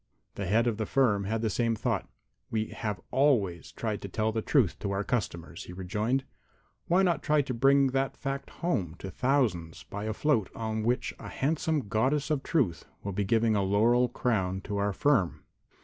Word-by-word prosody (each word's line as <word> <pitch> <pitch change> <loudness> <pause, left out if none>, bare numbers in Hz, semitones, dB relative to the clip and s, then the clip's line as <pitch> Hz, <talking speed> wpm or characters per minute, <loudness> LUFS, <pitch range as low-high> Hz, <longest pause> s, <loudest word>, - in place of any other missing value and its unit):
The 100 - -4
head 115 +5 +3
of 115 -3 0
the 110 - -2
firm 105 -8 +2
had 110 +3 -1
the 110 - +2
same 115 0 +1
thought. - - -2 0.4
"We 110 -1 -1
have 105 -4 -4
always 120 - +2
tried 110 -3 -3
to - - -5
tell 110 +3 0
the 110 0 -1
truth 120 - +2
to 100 - -3
our 100 +1 -1
customers," 85 -8 -3
he 90 - -9
rejoined. 105 +8 -1 0.6
"Why 180 +3 +4
not 170 -5 +2
try 150 -1 +2
to 130 - -4
bring 135 +3 +4
that 135 +1 -1
fact 135 0 -4
home 95 - -2
to 95 - -7
thousands 110 - 0
by 100 +1 -6
a 110 - -1
float 115 -6 +1
on 110 -1 -2
which 120 +3 0
a - - -8
handsome 150 -2 0
Goddess 135 +9 +1
of 145 -3 +1
Truth 125 - 0 0.2
will 100 - -3
be 100 +2 0
giving 110 +2 +2
a 100 - +2
laurel 115 +6 +3
crown 95 -6 0
to 100 +1 -4
our 100 0 +1
firm?" 110 -5 +1
110 Hz, 195 wpm, -29 LUFS, 100-135 Hz, 0.6 s, Why